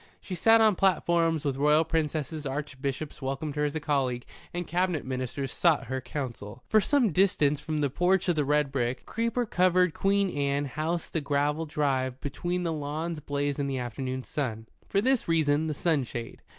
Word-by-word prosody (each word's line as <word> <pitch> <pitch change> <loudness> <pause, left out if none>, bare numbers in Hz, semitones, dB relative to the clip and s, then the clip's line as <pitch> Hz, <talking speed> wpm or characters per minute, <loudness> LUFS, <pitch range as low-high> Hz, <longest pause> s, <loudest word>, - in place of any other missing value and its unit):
She 190 - -8
sat 225 +6 +5
on 215 -3 +5
platforms 170 -4 +2
with 135 -2 0
Royal 150 +3 +4
princesses, 155 -1 -2
Archbishops 140 +1 -4
welcomed 135 +2 -3
her 150 0 +1
as 145 +1 -2
a - - 0
colleague, 135 -5 -1 0.3
and 175 0 -3
Cabinet 180 -3 0
Ministers 130 +1 -3
sought 165 -6 +3
her 130 - -2
counsel. 120 -5 -6
For 215 - +4
some 250 -2 +2
distance 150 -5 +3
from 155 -1 -2
the 145 - +2
porch 180 +5 +2
of 175 - +2
the 150 - +2
red 150 0 +1
brick, 125 -2 -2
creeper 230 +2 -1
covered 180 -3 +3
Queen 195 -2 +1
Anne 140 0 0
house 155 +4 -2
the 160 - -2
gravel 145 +2 0
drive 130 -4 0
between 175 +6 -3
the 165 -2 -1
lawns 155 +2 -3
blazed 145 0 -2
in 140 - 0
the 135 -1 -2
afternoon 130 +1 -4
sun. 115 -7 -3 0.2
For 200 - +2
this 260 +1 +1
reason, 160 -2 +2
the 155 - -2
sunshade. 135 -8 -2
150 Hz, 180 wpm, -28 LUFS, 140-170 Hz, 0.3 s, sat